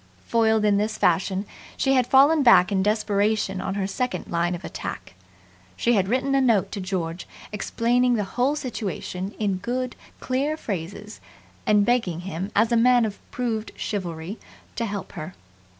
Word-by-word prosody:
Foiled 220 -2 +2
in 205 -1 +4
this 215 +2 -1
fashion, 190 +3 +1 0.3
she 270 - +2
had 255 -2 +3
fallen 285 +4 +5
back 200 -8 +6
in 190 -1 +2
desperation 205 -1 +1
on 195 - -3
her 200 -1 -1
second 200 -1 -2
line 170 +1 0
of 175 - -9
attack. - - -6 0.6
She 240 - +2
had 195 -4 +2
written 260 +5 0
a 275 - +4
note 230 -7 +2
to 200 - -4
George, 180 -3 -3 0.2
explaining 240 +4 +1
the 210 - 0
whole 250 +8 0
situation 200 - -4
in 200 -3 0
good, 245 +5 -3 0.2
clear 280 +4 -1
phrases 200 - -6 0.5
and 210 -1 +4
begging 215 -9 +1
him 185 +2 -5
as 220 +3 +3
a - - +4
man 245 0 +5
of 205 -2 -5
proved 225 -3 -3
chivalry 175 -1 -4 0.4
to 230 - -1
help 200 -2 -5
her. 155 +4 -7
210 Hz, 165 wpm, -24 LUFS, 190-245 Hz, 0.6 s, back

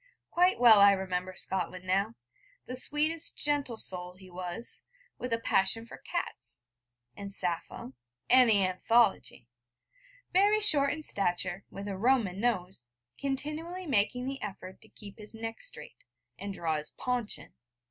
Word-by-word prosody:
Quite 360 -2 +3
well 230 -4 +8
I 200 0 +8
remember 185 -1 -3
Scotland 185 0 -3
now 195 +5 0 0.5
the 250 - -6
sweetest, 305 +5 +2
gentle 285 -5 -1
soul 180 -3 0
he 185 -1 -15
was, 180 +5 -5 0.4
with 250 - -5
a 230 - +2
passion 225 0 +2
for - - -12
cats, 120 - -5 0.5
and 200 -1 -7
Sappho, 170 -8 -4 0.3
and 255 -1 +7
the 200 -3 +5
Anthology, 190 - +1 0.9
very 405 +3 +4
short 285 -9 +5
in 310 +1 -5
stature, 190 -4 -1
with 200 +1 -8
a 195 -2 -4
Roman 225 -5 +1
nose, 185 - -2 0.3
continually 305 +7 -4
making 250 -2 +1
the 270 0 -5
effort 190 -2 -8
to - - -14
keep 205 0 -12
his 215 +1 -12
neck 225 0 -6
straight, - - -6 0.3
and 200 - -6
draw 165 -5 -2
his 150 0 -3
paunch 245 -7 -2
in. 145 - -15
215 Hz, 145 wpm, -29 LUFS, 185-270 Hz, 0.9 s, well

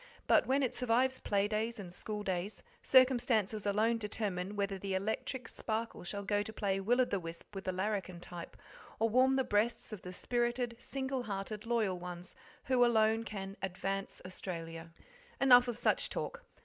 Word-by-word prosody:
But - - +4
when 270 +2 +3
it 255 - 0
survives 250 +2 +2
play 200 0 +1
days 220 +2 -1
and 185 -4 -7
school 210 +2 -4
days, 190 +1 -3 0.2
circumstances 240 -5 +4
alone 220 +3 +2
determine 205 -3 -2
whether 200 -1 -1
the 195 0 -2
electric 220 +5 -2
sparkle 225 -2 -3
shall 200 +3 -4
go 205 +1 +1
to 210 - -5
play 200 -3 -1
will 235 +6 +2
o' - - +4
the 200 - -1
wisp 165 +3 -9
with 195 -1 -6
the 185 - 0
larrikin 190 -1 -2
type, 175 -1 -9 0.4
or 225 +1 +2
warm 260 +3 +4
the 265 - +3
breasts 220 +1 0
of 210 - -7
the 180 - -7
spirited, 240 +3 -1
single 265 +1 -3
hearted, 210 0 -5
loyal 215 -6 +1
ones 180 0 -7 0.3
who 255 -1 +3
alone 225 -1 +4
can 195 -2 -6
"advance 195 +1 -3
Australia." 165 -3 -6 0.5
Enough 250 -2 +7
of 240 -2 -2
such - - +2
talk. - - -4
210 Hz, 175 wpm, -34 LUFS, 195-240 Hz, 0.5 s, Enough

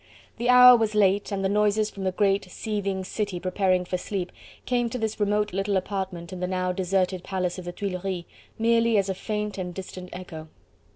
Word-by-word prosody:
The 240 +1 0
hour 250 0 +10
was 220 -2 0
late, 200 0 +3
and 195 -1 -1
the - - +4
noises 210 +1 +2
from 195 -1 -6
the 185 - +1
great, 195 +1 +1
seething 195 -1 -3
city 200 -1 -3
preparing 185 0 +1
for 180 0 -2
sleep 185 -2 -4 0.3
came 240 -2 +1
to 250 - -4
this 220 -2 -3
remote 210 -1 +1
little 195 +1 0
apartment 190 -2 -4
in 185 - -6
the 180 - -1
now 185 0 -1
deserted 185 0 0
Palace 185 -1 -2
of 180 - -9
the 175 - -4
Tuileries, 185 -1 -4 0.3
merely 230 0 +3
as 195 -1 +1
a - - +1
faint 210 +1 -4
and 180 -1 -5
distant 185 -1 -8
echo. 165 -4 -8
195 Hz, 195 wpm, -26 LUFS, 185-210 Hz, 0.3 s, hour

